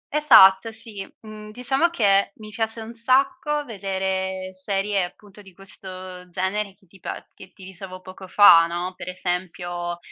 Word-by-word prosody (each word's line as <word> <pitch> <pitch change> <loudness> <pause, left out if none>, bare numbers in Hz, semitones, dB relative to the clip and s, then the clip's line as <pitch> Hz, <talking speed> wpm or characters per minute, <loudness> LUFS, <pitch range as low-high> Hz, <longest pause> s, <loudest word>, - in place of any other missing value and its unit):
Esatto, 210 -8 +6
sì. 220 -3 -8 0.2
Mhmm, 215 -1 -11
diciamo 265 +8 +2
che 200 -8 +2
mi 215 -1 -12
piace 225 +1 -1
un 225 +1 -9
sacco 275 +5 0
vedere 190 -3 -3
serie 195 0 -1
appunto 205 +3 -15
di 190 -3 -17
questo 185 -1 -10
genere 190 +3 -3
che 195 0 -29
ti 190 +2 -20
pa - - -7
che 190 -1 -15
ti 190 - -17
dicevo 185 0 -10
poco 185 +1 -12
fa, 170 -4 +7
no. 175 +2 -4
Per 185 - -8
esempio 175 -1 -4
195 Hz, 155 wpm, -23 LUFS, 185-215 Hz, 0.2 s, fa